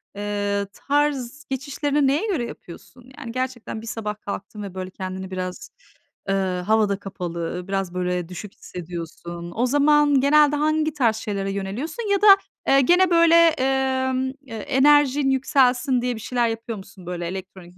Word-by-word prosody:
eee, 205 -1 -2
tarz 285 -1 -1
geçişlerini 280 +1 0
neye 300 +11 +1
göre 315 - -1
yapıyorsun? 245 +6 -12
Yani, 235 -5 -7
gerçekten 255 -3 -4
bir 230 - -10
sabah 210 -2 -4
kalktın 205 +1 -6
ve 195 -2 -7
böyle 185 0 -5
kendini 190 0 -6
biraz 185 -1 -5 0.6
eee, 195 - +2 0.3
havada 210 -2 +2
kapalı, 180 -2 -5
biraz 195 -2 -2
böyle 180 -1 -2
düşük 190 +2 -8
hissediyorsun. 170 0 -8
O 240 +3 +1
zaman 290 0 +4
genelde 295 +1 +5
hangi 310 +1 +1
tarz 235 -7 +2
şeylere 200 -3 -3
yöneliyorsun 270 - -4
ya 400 0 +2
da, 425 - +5 0.4
eee, 275 0 +5
gene 355 +6 +4
böyle, 335 0 +6
emm, 265 -4 +2
eee, 260 -5 -10
enerjin 285 +2 +3
yükselsin 260 -1 +2
diye 245 -1 -1
bir - - -8
şeyler 240 0 0
yapıyor 225 -1 -4
musun, 190 -2 -13
böyle 175 -1 -4
elektronik 185 -1 -9
240 Hz, 150 wpm, -23 LUFS, 195-285 Hz, 0.6 s, böyle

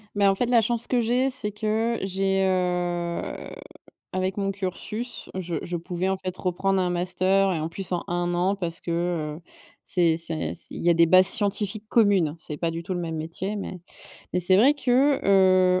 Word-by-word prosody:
Bah 200 -1 +4
en - - -1
fait, 245 - 0
la 235 -2 +5
chance 235 +1 -1
que 245 -2 +1
j'ai, 250 +4 +1
c'est 210 -5 -2
que 220 +2 -1
j'ai, 195 0 0
heu, 175 -2 -1 0.9
avec 185 +1 -2
mon 195 -1 -1
cursus, 205 +5 -4
je 175 -2 -4
je 175 0 -4
pouvais, 175 +2 -3
en 190 - -1
fait, 185 -1 -6
reprendre 190 +1 0
un 180 - 0
master 185 +2 +1
et 160 - -2
en 160 +1 -3
plus, 190 +1 -6
en 175 - -1
1 175 0 -1
an 185 +3 +1
parce 170 -3 -4
que, 170 - -5
heu, 165 -2 -2 0.4
c'est 170 -3 +2
c'est 165 -1 -1
c - - -1
il - - -6
y 175 - +3
a 170 - +6
des 170 0 +5
bases 185 +2 +6
scientifiques 205 +1 +3
communes, 195 -9 +3
c'est 150 -2 -7
pas 170 -1 -1
du 165 +1 -6
tout 185 +1 -4
le 175 - -3
même 165 -2 -4
métier, 165 +6 -4
mais 190 -3 -6 0.5
mais 180 - 0
c'est 185 +2 +4
vrai 270 +8 +5
que, 275 +1 +2
heu, 185 -2 +4
185 Hz, 205 wpm, -24 LUFS, 175-205 Hz, 0.9 s, a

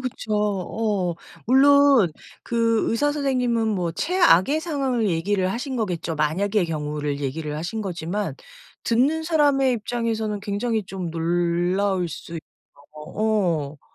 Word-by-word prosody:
그쵸. 250 -4 -5
어. 205 -2 -1 0.3
물론 275 - +5 0.3
그 230 -1 +1
의사 290 +6 +1
선생님은 250 -6 0
뭐 180 -6 -1
최악의 315 - +3
상황을 270 -9 -1
얘기를 185 +2 0
하신 255 +5 -4
거겠죠. 175 -7 -2
만약의 180 +6 0
경우를 150 -2 -3
얘기를 150 +2 -3
하신 175 +8 -4
거지만 190 +1 -3 0.5
듣는 275 +8 +2
사람의 290 -5 +3
입장에서는 225 -2 -2
굉장히 210 +2 -1
좀 185 -3 -5
놀라울 175 +3 0
수 165 - -9
있죠. 160 - -5 0.5
어. 165 -3 -1
205 Hz, 265 characters per minute, -23 LUFS, 170-245 Hz, 0.5 s, 물론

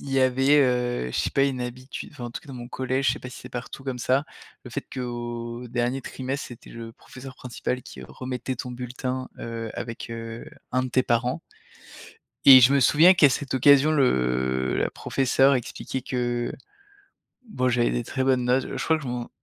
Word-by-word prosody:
il 140 - -8
y 135 - +2
avait, 130 +2 +4
heu, 125 - +1
je - - -2
sais - - 0
pas, 135 - +3
une 135 -2 -1
habitude 125 +2 -6
enfin, 140 -4 -8
en 120 - -5
tout - - -6
cas, - - -19
dans 135 - -7
mon 120 -1 -7
collège, 130 +2 -1
je - - +4
sais - - -6
pas 125 - -8
si - - -10
c'est 125 - -10
partout 125 +2 -7
comme 130 -2 -3
ça, 130 +4 +2 0.4
le 125 - -9
fait 140 +4 -4
qu'au 120 -1 -5
dernier 120 +2 -1
trimestre, 130 +2 -5
c'était 120 0 -12
le 115 -1 -8
professeur 130 +2 -12
principal 125 0 -4
qui - - -10
remettait 130 0 -5
ton 125 +1 -6
bulletin, 125 +1 -4
heu, 115 -1 -5
avec, 115 0 -6
heu, 115 0 -6 0.3
1 130 0 +2
de 130 - -3
tes 130 +1 +1
parents. 120 +1 0 1.0
Et 130 -1 +11
je 125 +2 +6
me 140 - +4
souviens 160 +8 +6
qu'à 165 -5 +6
cette 135 +1 -2
occasion, 140 +3 +6
le 65 - +1
la - - 0
professeure 135 +1 +2
expliquait 130 +1 -4
que, 120 -1 -2 1.0
bon, 130 - -1
j'avais 120 -1 +2
des 120 - -1
très 130 +3 -2
bonnes 130 -2 +2
notes. 130 +2 +2
Heu, - - -5
je - - -3
crois 160 - +2
que 155 - -9
je - - -6
m'en 120 -1 -4
125 Hz, 210 wpm, -25 LUFS, 120-135 Hz, 1.0 s, Et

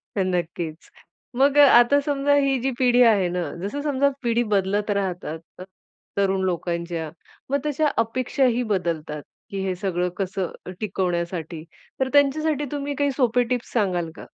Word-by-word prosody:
तर 195 - +1
नक्कीच. 170 -2 -3 0.5
मग 275 +3 +3
अ, 290 -1 +9
आता 245 +4 +4
समजा 285 0 +1
ही 270 -1 +1
जी 265 +3 -1
पिढी 250 -1 +4
आहे 195 -4 +2
ना, 180 +1 -2 0.2
जसं 245 +9 -3
समजा 280 -1 +2
पिढी 235 0 +2
बदलत 200 +2 +1
राहतात 180 -5 -3 0.2
अ, - - -6 0.5
तरुण 195 -1 +1
लोकांच्या. 170 -2 -2 0.4
मग 280 +1 +1
तशा 300 +1 +1 0.2
अपेक्षाही 250 +1 0
बदलतात, 160 -5 -3 0.3
की 195 -1 -4
हे 185 -1 -1
सगळं 180 -1 -1
कसं 190 -2 -2
अ, - - -7
टिकवण्यासाठी. 175 -5 -3 0.4
तर 265 0 +1
त्यांच्यासाठी 295 +1 +2
तुम्ही 285 -1 -3
काही 285 0 +1
सोपे 245 -2 +3
टिप्स 245 -1 -4
सांगाल 180 -7 0
का? - - -10
205 Hz, 155 wpm, -23 LUFS, 180-270 Hz, 0.5 s, अ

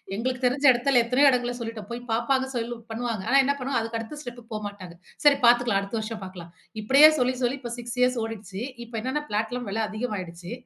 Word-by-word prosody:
எங்களுக்கு 255 +3 -3
தெரிந்த 275 +3 +3
இடத்தில 245 0 +3
எத்தனயோ 255 +4 +4
இடங்களில 245 -1 0
சொல்லிவிட்டோம் 225 -1 -6
போய் 240 +1 -5
பார்ப்பாங்க 260 +4 +1
சொல்லி 240 0 -3
பண்ணுவாங்க. 225 -3 -3
ஆனா 275 - +5
என்ன 280 +2 +2
பண்ணுவாங்க 255 -2 -1
அதுக்கு 230 0 -4
அடுத்த 230 +7 -7
ஸ்டெப்க்கு 245 -2 -9
போகமாட்டாங்க. 200 -4 -7 0.3
சரி 285 -1 +7
பார்த்துக்கள்ளலாம். 240 -4 +4
அடுத்த 200 +3 -4
வருஷம் 215 -1 -5
பார்க்கலாம். 175 -2 -10 0.3
இப்படியே 275 +8 +7
சொல்லி 255 +1 +1
சொல்லி 250 +3 0
இப்ப 240 -2 -6
6 240 0 -7
ஏர்ஸ் 250 -1 +2
ஓடிடுச்சு. 210 -3 -6 0.2
இப்போ 230 0 -11
என்னென்ன 260 +5 -2
பிளாட்லாம் 225 +3 -2
வில 220 +3 -1
அதிகமாிகிட்டுச்சு. 190 -6 -5
235 Hz, 190 wpm, -25 LUFS, 215-255 Hz, 0.3 s, சரி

